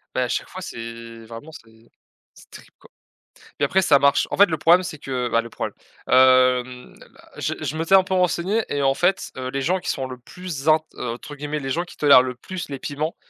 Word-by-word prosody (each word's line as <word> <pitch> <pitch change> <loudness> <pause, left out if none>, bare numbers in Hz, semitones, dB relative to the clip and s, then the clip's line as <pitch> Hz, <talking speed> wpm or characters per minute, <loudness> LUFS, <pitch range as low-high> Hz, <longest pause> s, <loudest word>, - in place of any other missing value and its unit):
Beh, - - +1
à - - -1
chaque - - -3
fois, - - -8
c'est 115 0 -9
vraiment, 115 +8 -10
c'est 115 -5 -17 0.4
c'est - - -19
terrible, - - -15
quoi. - - -19 0.5
Puis 140 - -4
après, 190 +7 +2
ça 145 -6 +4
marche 140 0 +3
en - - -2
fait, 200 - +8
le 160 -5 -3
problème, 170 +4 +4
c'est 165 -3 -6
que 130 -3 -3
bah, 115 - +2
le 115 - -10
problème, - - -5 0.3
hem, 130 -1 +3 0.4
je - - -2
je 155 - -3
m'étais 165 +4 +3
un 190 - +6
peu 190 - -4
renseigné 185 +4 +1
et 145 0 -1
en 135 0 +3
fait, 180 +6 0
heu, 130 0 -4
les 135 +1 -3
gens 180 +7 0
qui - - -6
sont 135 -1 -2
le 130 -1 -8
plus 180 +9 -11
zin 155 +1 +5 0.2
entre 125 +5 -6
guillemets, 150 +1 -4
«les 135 - -5
gens 170 +6 -1
qui - - -15
tolèrent 140 -3 +7
le 125 -1 -4
plus 180 +7 -7
les 140 -2 -6
piments», 150 +3 -4
140 Hz, 230 wpm, -22 LUFS, 125-170 Hz, 0.5 s, fait